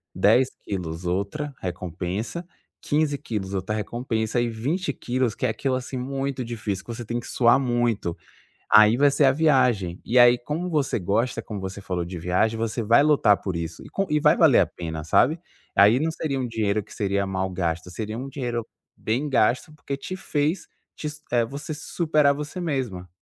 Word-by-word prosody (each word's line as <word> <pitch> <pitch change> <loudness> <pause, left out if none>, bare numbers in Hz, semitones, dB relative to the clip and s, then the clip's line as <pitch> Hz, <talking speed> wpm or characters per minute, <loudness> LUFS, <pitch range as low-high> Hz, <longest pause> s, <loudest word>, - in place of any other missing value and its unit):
10 130 +1 +4
quilos, 90 -3 -5
outra 100 - -2
recompensa. 90 - -4 0.4
15 145 -1 +1
quilos 100 -6 -4
outra 95 +3 -2
recompensa 115 +1 -2
e 120 - 0
20 145 +13 -2
quilos 125 -2 -1
que - - -2
é - - +2
aquilo, 130 +4 -1
assim, 130 +1 -4
muito 135 0 -3
difícil 110 -5 -4
que 115 - -6
você 120 -1 -7
tem 120 +2 -2
que 120 - -9
suar 120 +2 +4
muito. 120 -8 0 0.6
Aí, 110 +2 +7
vai 145 +1 +5
ser 140 +1 +2
a 130 - +5
viagem". 125 - +2
E 125 +2 +2
aí, 120 0 +7
como 155 +8 -4
você 145 -6 0
gosta, 110 +7 0
como 105 -3 -6
você 95 +1 -6
falou, 90 -3 -2
de 90 -1 -6
viagem, 90 +7 +1
você 115 +1 -2
vai 115 +6 +5
lutar 145 -9 +4
por 95 - -3
isso 85 0 -5
e - - -11
com 195 0 -1
e 150 - +3
vai 150 0 +5
valer 155 -7 +6
a - - +3
pena, 80 -3 -6
sabe. 140 - +3 0.4
Aí, 105 +5 +6
não 160 +2 +1
seria 145 -4 -2
um 125 - -2
dinheiro 110 -2 0
que - - -16
seria 100 -1 0
mal 95 0 -1
gasto. 90 -1 -2
Seria 110 +3 -5
um 135 +2 -5
dinheiro 120 -4 -3 0.3
bem 125 +7 -1
gasto. 125 +4 +2
Porque 140 -2 -5
te 185 +7 -6
fez 155 0 -1 0.3
te 150 - -6
s 150 0 -10
eh, 120 -1 +3
você 140 +6 -6
se 155 - -10
superar 155 -4 +3
a - - -3
você 150 +5 -6
mesma. 125 - -3
120 Hz, 200 wpm, -24 LUFS, 100-140 Hz, 0.6 s, Aí